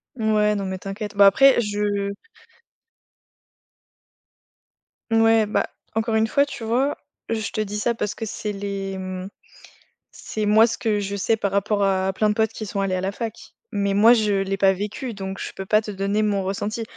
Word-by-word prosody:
Mouais, 215 -2 +2
non, 200 -1 -3
mais 190 0 -3
t'inquiète. 205 +2 -6
Bah, 200 0 +7
après 270 +7 +6
je 205 -2 -1 3.0
N 225 0 +4
ouais, 225 -1 +4
bah, 210 - -1 0.3
encore 225 0 0
une 220 0 +3
fois, 280 +5 +3
tu 250 -5 -7
vois, 255 +6 +1 0.3
je 220 -2 -2
te 215 - -2
dis 210 0 -3
ça 235 +3 0
parce 210 -2 -2
que 225 - -5
c'est 210 0 -4
les, 195 -1 -4
mmh 185 0 -6 0.8
c'est 215 -1 -4
moi, 215 +2 +6
ce 235 - -3
que 215 -3 0
je 200 0 -3
sais 220 +3 +1
par 200 -2 -1
rapport 200 +1 +1
à 190 -1 +1
plein 215 +2 +1
de - - +2
potes 220 0 +1
qui 220 - -6
sont 205 0 -4
allés 195 -1 0
à 185 - -2
la 190 +1 -1
fac. 225 +2 -5 0.3
Mais, 200 -1 0
moi, 220 +4 +7
je 215 -3 +2
l'ai 195 0 -2
pas 195 0 +4
vécu 210 +6 -5
donc 195 -1 -6
je - - -5
peux 195 - -7
pas 215 +2 +3
te 210 - -6
donner 200 +2 -1
mon 200 -2 0
ressenti. 205 +4 -3
210 Hz, 200 wpm, -23 LUFS, 195-220 Hz, 3.0 s, Bah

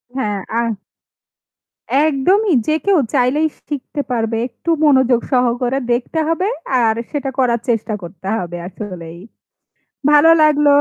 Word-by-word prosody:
হ্যাঁ 210 -6 -1 0.2
আর 235 - 0 1.4
একদমই 350 +7 +2
যে 310 - +2
কেউ 395 -3 +4 0.2
চাইলেই 275 +4 +2 0.2
শিখতে 290 0 -4
পারবে। 225 -1 -1
একটু 255 +7 -8 0.2
মনোযোগ 260 -4 +4
সহকারে 250 +1 +1
দেখতে 250 +7 -1
হবে 330 +4 0 0.4
আর 220 -1 +2 0.2
সেটা 285 -2 -2
করার 235 -2 +2
চেষ্টা 225 -1 0
করতে 175 +2 -10
হবে 175 -1 -5
আসলেই। 180 -4 -8 0.9
ভালো 300 +2 +6
লাগল। 295 -1 +4
250 Hz, 120 wpm, -18 LUFS, 225-295 Hz, 1.4 s, ভালো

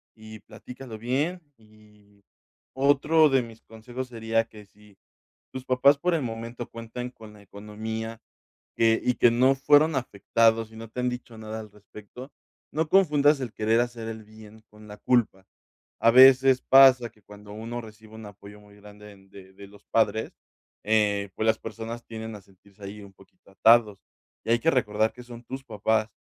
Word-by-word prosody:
y 110 0 -12
platícalo 115 +2 -11
bien, 145 +10 -2 0.2
y 105 -2 -24 0.5
otro 145 +3 +3
de 135 -1 +2
mis 115 -1 -13
consejos 120 +3 -9
sería 115 -1 -1
que 105 -2 -15
si 105 0 -23 0.6
tus 130 -1 -7
papás 135 +3 +3
por 180 +3 0
el 160 - -1
momento 115 0 -6
cuentan 115 +2 -7
con 110 -3 -15
la 105 - -17
economía 110 +3 -7 0.6
que 115 0 +3
y 125 - +1
que 120 - +4
no 130 +3 +3
fueron 145 +3 +3
afectados 115 -1 0
y - - -15
no 115 0 -10
te 125 - -8
han 125 - 0
dicho 125 -2 -9
nada 110 0 -7
al 105 -2 -13
respecto, 105 +5 -13 0.4
no 155 +1 -1
confundas 150 -6 +3
el 120 -4 -6
querer 110 +1 +1
hacer 120 -2 -5
el 110 -1 -8
bien 110 0 -16
con 105 0 -17
la 105 0 -11
culpa. 105 -6 0 0.6
A 115 - +5
veces 130 +1 +6
pasa 130 -3 +6
que 105 -1 -28
cuando 105 0 -13
uno 115 +3 -6
recibe 110 0 -15
un 110 -1 -10
apoyo 100 +1 -14
muy 105 0 -19
grande 105 0 -14
en 95 -1 -20
de 95 -1 -15
de 100 +1 -13
los 100 +1 -19
padres, 110 0 0 0.5
eh, 105 -2 +1
pues 110 - -2
las 110 0 +2
personas 115 +1 -8
tienden 110 -1 -8
a 105 - -11
sentirse 100 +1 -22
ahí 105 +2 -9
un 100 -1 -14
poquito 95 - -23
atados. 110 -1 +3 0.5
Y - - -6
hay 120 - +3
que 165 +4 +2
recordar 110 -3 0
que 125 - -12
son 120 -1 -12
tus 130 +2 -8
papás, 110 -2 -1
110 Hz, 180 wpm, -25 LUFS, 105-125 Hz, 0.6 s, veces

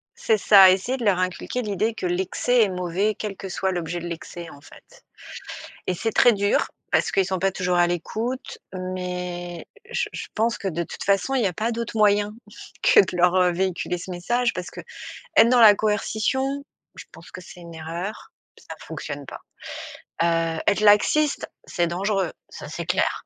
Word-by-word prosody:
C'est 220 - +1
ça, 195 -2 +8
essayer 230 +8 0
de 235 - -4
leur 200 -4 +3
inculquer 185 +7 -2
l'idée 215 +2 -1
que 185 - -4
l'excès 190 +7 +1
est 210 - +3
mauvais 185 +3 -1
quel 205 -3 -5
que 195 - -7
soit 190 +1 -1
l'objet 175 0 -3
de 175 - -6
l'excès, 170 0 -7
en 140 - -14
fait. - - -18 0.8
Et 185 - +1
c'est 225 +5 -2
très 240 +2 +5
dur, 200 0 +1 0.2
parce - - +2
qu'ils 195 - +2
sont 190 0 -2
pas 195 +2 +1
toujours 180 -1 -1
à 175 0 +4
l'écoute, 225 - -4
mais, 180 -1 -5 0.2
heu, - - -22
je - - -1
je - - -6
pense 230 +1 +1
que 195 - -4
de 170 -1 -2
toute - - -8
façon 200 +7 +1
il 255 - +2
y 200 - +3
a 180 - -3
pas 225 +7 -1
d'autre 230 -1 -4
moyen 205 0 +3 0.5
que - - +6
de 185 -2 -4
leur 180 +1 +4
véhiculer 180 -1 -1
ce 185 +2 -8
message, 240 +8 0
parce 180 -1 -5 0.5
qu'être 225 +1 +3
dans 250 -1 +5
la 210 -2 +9
coercition, 220 +7 -1 0.3
je - - -9
pense - - -14
que - - -9
c'est 180 0 -13
une 170 -1 -11
erreur, 170 +6 -6 0.2
p - - -19
ça - - -7
fonctionne - - -7
pas. - - -9 0.8
Heu, 165 -1 +1
être 205 +1 +3
laxiste, 245 +8 +3 0.2
c'est 175 -2 0
dangereux, 190 0 -1 0.2
ça - - -9
c'est - - -5
clair. - - 0
190 Hz, 190 wpm, -24 LUFS, 175-215 Hz, 0.8 s, la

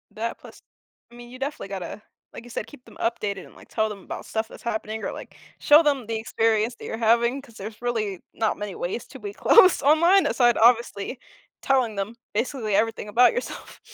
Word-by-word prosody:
That 230 +2 -3
plus, - - -14 0.5
I 240 - -15
mean, 240 0 -11
you 255 +1 -11
definitely 275 -7 -4
gotta, 195 +1 -6 0.3
like - - -9
you 245 - -13
said, 225 - -5
keep 290 -4 -15
them - - -16
updated 210 -4 -2
and, - - -18
like, - - -17
tell 220 -1 0
them 200 -3 -9
about - - -7
stuff 220 0 -2
that's - - -14
happening 220 -1 -3
or, - - -2
like, - - -10 0.2
show 300 +3 +6
them 280 -5 +1
the 225 - -2
experience 225 +1 0
that - - -11
you're 225 - -4
having, 235 +3 +2
'cause 250 -5 -18
there's 215 +2 -8
really 215 -6 -2
not 220 -1 0
many 205 -2 -5
ways 190 +7 -4
to - - -12
be 405 -1 -6
close 375 -4 +6
online 335 +6 +5
aside 240 -3 +3
obviously 235 -1 +2 0.4
telling 255 -6 +1
them 200 +4 -4 0.2
basically 225 -1 -1
everything 225 0 0
about 240 +4 +5
yourself. 485 - -6
230 Hz, 205 wpm, -24 LUFS, 215-255 Hz, 0.5 s, show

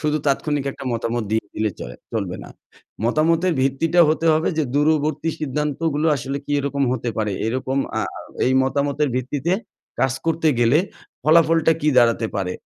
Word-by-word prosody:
শুধু 150 0 0
তাৎক্ষণিক 145 0 0
একটা 135 - -10
মতামত 115 0 -2
দিয়ে 110 0 0
দিলে 110 0 0
চলে 60 0 -7 0.2
চলবে - - -2
না। - - -11 0.6
মতামতের 165 +7 +2
ভিত্তিটা 155 +6 +2
হতে 155 +1 +1
হবে 155 +1 +1
যে 155 - +2
দূরবর্তী 155 +1 +1
সিদ্ধান্তগুলো 150 +2 -1
আসলে 135 +2 -4
কী 145 - -1
রকম 140 0 -1
হতে 125 -1 -2
পারে? 105 -2 -1
এরকম 130 +3 -1 0.2
আ - - +1 0.5
এই 130 - +2
মতামতের 140 +2 0
ভিত্তিতে 140 +6 -1 0.5
কাজ 130 -1 +2
করতে 165 -1 +2
গেলে 120 +5 +4 0.4
ফলাফলটা 165 +1 +4
কী 150 - +1
দাঁড়াতে 115 -1 +3
পারে? 90 -2 -2
145 Hz, 155 wpm, -21 LUFS, 130-155 Hz, 0.6 s, গেলে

